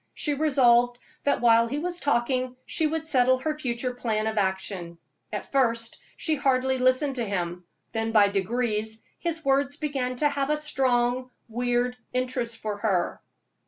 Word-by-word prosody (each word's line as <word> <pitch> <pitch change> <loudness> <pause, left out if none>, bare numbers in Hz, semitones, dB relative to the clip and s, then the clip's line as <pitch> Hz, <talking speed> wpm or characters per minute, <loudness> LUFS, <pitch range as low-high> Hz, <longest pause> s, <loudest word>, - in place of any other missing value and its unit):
She 295 - 0
resolved 245 -5 +4 0.3
that 285 - +2
while 230 -1 +5
he 280 - -3
was 350 +3 -3
talking 255 -2 0
she 320 - 0
would 320 +1 -2
settle 260 -4 +4
her 305 +4 -2
future 250 -2 -2
plan 220 -3 -1
of 220 0 -1
action. 190 -3 -2 0.3
At - - -5
first 230 -4 +1 0.2
she 315 - 0
hardly 265 -1 +1
listened 255 +2 +2
to 240 - 0
him, 180 -4 -3 0.3
then 225 0 -1
by 210 -2 +5
degrees 220 +2 -1 0.2
his 330 -2 -3
words 275 +1 +2
began 275 -5 -2
to 295 +4 +2
have 280 -1 -1
a 300 - +2
strong, 255 -4 +1 0.2
weird 245 +1 0 0.2
interest 250 -2 -1
for 215 -2 -4
her. 195 -5 0
250 Hz, 160 wpm, -26 LUFS, 225-275 Hz, 0.3 s, while